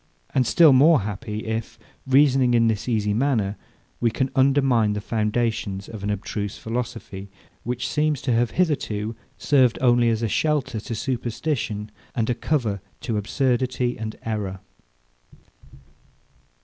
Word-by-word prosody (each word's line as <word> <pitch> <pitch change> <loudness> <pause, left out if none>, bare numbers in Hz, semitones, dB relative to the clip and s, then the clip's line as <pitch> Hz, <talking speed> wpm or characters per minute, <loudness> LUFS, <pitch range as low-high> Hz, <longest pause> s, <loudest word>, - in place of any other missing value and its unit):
And 130 -2 +2
still 160 -5 +6
more 145 +1 +6
happy, 105 +1 -5
if, 115 +1 -4 0.3
reasoning 130 -2 +4
in 115 -1 +4
this 110 +2 -1
easy 105 -3 +1
manner, 110 -5 +1 0.4
we 120 - +2
can 130 +4 -1
undermine 130 -5 +3
the 105 - -2
foundations 105 -2 -1
of 110 -3 -8
an 100 - -3
abstruse 105 0 -3
philosophy, 115 -4 -5 0.3
which 125 +1 -3
seems 150 -1 0
to 125 - +1
have 120 0 +2
hitherto 115 - -1 0.2
served 130 -4 +3
only 120 -2 +4
as 115 0 0
a - - +2
shelter 145 -3 0
to 115 +2 -5
superstition, 120 -3 -3 0.2
and 115 0 0
a - - +2
cover 115 - -1 0.2
to 115 - -2
absurdity 125 +2 0
and 110 0 -5
error! 100 -4 -3
115 Hz, 135 wpm, -23 LUFS, 105-130 Hz, 0.4 s, still